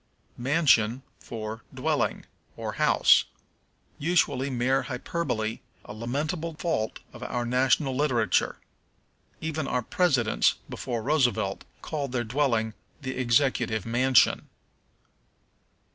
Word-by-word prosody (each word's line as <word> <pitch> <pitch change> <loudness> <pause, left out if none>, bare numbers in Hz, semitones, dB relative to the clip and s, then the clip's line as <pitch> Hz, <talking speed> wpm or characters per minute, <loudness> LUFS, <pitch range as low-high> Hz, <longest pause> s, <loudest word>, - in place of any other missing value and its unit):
Mansion 130 -3 +3 0.2
for 110 -1 -6
Dwelling, - - -1 0.3
or - - -4
House. - - +4 0.7
Usually 145 -4 +1
mere 130 +1 +1
hyperbole, 125 -5 -3 0.3
a - - -8
lamentable 150 +9 -3
fault 130 -10 -2 0.2
of - - -11
our 120 -1 -2
national 130 +2 +2
literature. 125 -7 +1 0.8
Even 155 -2 -2
our 125 -1 0
presidents, 135 -8 +2
before 120 -3 -4
Roosevelt, 120 -8 +1 0.2
called 140 -5 -3
their 120 -2 0
dwelling 115 -3 0 0.3
the 130 0 -3
Executive 120 -4 +1
Mansion. 125 +2 +3
125 Hz, 100 wpm, -27 LUFS, 115-145 Hz, 0.8 s, House